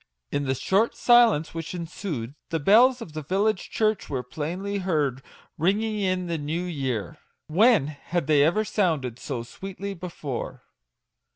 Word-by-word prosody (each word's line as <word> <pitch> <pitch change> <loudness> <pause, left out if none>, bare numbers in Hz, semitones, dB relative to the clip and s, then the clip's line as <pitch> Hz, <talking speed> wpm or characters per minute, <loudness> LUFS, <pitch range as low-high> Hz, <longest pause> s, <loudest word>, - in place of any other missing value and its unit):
In 145 0 -1
the 135 0 0
short 195 - +1
silence 235 -10 +4
which 165 +1 -5
ensued, 165 - -5 0.2
the 165 - -1
bells 235 - +5
of 160 - -12
the 155 - -4
village 195 +6 0
church 215 -1 0
were 130 -3 -2
plainly 175 - -4
heard 150 -8 0 0.4
ringing 210 +6 +1
in 185 -2 0
the 170 -2 -2
new 155 +4 -2
born 180 -1 -4
year! 130 -8 -3 0.3
When 200 - +4
had 155 +3 -3
they 145 -1 +4
ever 210 +8 +2
sounded 155 - 0
so 125 -5 -4
sweetly 195 +9 -7
before 165 -8 -6
170 Hz, 155 wpm, -25 LUFS, 145-200 Hz, 0.4 s, bells